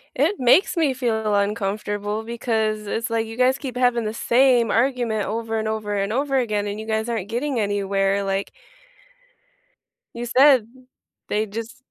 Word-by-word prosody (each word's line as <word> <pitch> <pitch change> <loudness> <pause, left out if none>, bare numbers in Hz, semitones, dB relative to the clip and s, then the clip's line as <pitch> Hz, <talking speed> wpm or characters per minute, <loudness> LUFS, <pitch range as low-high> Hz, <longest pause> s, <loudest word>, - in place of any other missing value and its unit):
It 320 +10 +1
makes 255 +13 +4
me 315 -6 +2
feel 220 -4 -1
uncomfortable 205 +1 -2
because 220 -2 -2
it's 225 +3 -3
like 225 0 0
you 225 +1 -9
guys 255 +1 +3
keep 255 -4 -6
having 245 -2 +2
the 215 0 -3
same 240 0 +3
argument 235 -4 0
over 225 0 -3
and 220 0 -2
over 215 -1 -3
and 200 +1 -1
over 275 +3 0
again, 210 -5 0
and 205 0 -4
you - - -8
guys 220 0 -1
aren't 220 -4 -3
getting 245 +1 -1
anywhere, 200 -1 0
like 195 0 -2 1.6
you 235 +1 -5
said, 255 -1 +5 0.6
they 210 +1 0
just 225 +2 -7
225 Hz, 160 wpm, -22 LUFS, 210-245 Hz, 1.6 s, said